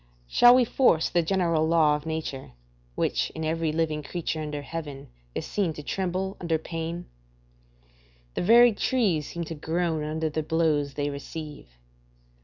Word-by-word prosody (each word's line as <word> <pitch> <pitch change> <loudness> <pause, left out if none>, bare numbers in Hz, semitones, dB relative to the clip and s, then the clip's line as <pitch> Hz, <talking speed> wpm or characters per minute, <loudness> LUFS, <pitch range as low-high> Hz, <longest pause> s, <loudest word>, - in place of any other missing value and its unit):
Shall 245 - +7
we 255 -1 +4
force 225 -10 +3
the 175 - +2
general 170 -3 +1
law 160 -2 +4
of 150 +1 -6
nature, 155 - -5 0.4
which - - 0
in 160 0 -3
every 160 0 0
living 155 -1 -1
creature 160 +1 -4
under 150 -1 -4
heaven 145 -3 -7 0.3
is - - -3
seen 190 -6 -1
to 150 - -9
tremble 190 +3 -2
under 165 -2 +1
pain? 165 +2 -5 1.3
The - - -2
very 235 +4 +6
trees 205 - +1
seem 170 - -5
to 165 - -6
groan 160 0 -1
under 160 +1 -2
the 155 - -1
blows 150 -3 0
they 145 0 -1
receive. 150 +1 -8
160 Hz, 155 wpm, -26 LUFS, 150-175 Hz, 1.3 s, Shall